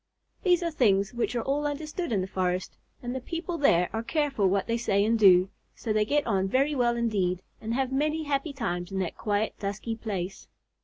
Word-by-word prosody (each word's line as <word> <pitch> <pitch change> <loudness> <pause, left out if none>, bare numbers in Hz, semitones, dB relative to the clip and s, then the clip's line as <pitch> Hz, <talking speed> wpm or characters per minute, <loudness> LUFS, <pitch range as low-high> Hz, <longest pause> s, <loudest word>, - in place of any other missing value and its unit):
These 355 -2 +3
are 335 - -1
things 200 -8 +2
which 240 +1 -1
are 235 - 0
all 290 +2 0
understood 305 +2 -4
in 200 -4 +1
the 185 - -3
forest, 185 -1 -2 0.3
and 245 0 -3
the 260 - -4
people 335 +5 -4
there 180 -11 +4
are 225 - -1
careful 275 -5 +1
what 195 +1 +1
they 230 - 0
say 205 -4 +1
and 225 +1 +2
do, 185 -2 +6 0.2
so 220 - -2
they 215 0 +2
get 290 +5 +1
on 195 -4 +1
very 270 +8 +2
well 240 -3 +1
indeed, 190 -6 0 0.2
and 225 +1 -2
have 265 0 0
many 305 +3 0
happy 285 0 -1
times 175 -10 -3
in 195 - -3
that 185 -3 -2
quiet, 210 +1 -1
dusky 205 +3 -3
place. 195 -4 -5
230 Hz, 210 wpm, -27 LUFS, 195-280 Hz, 0.3 s, do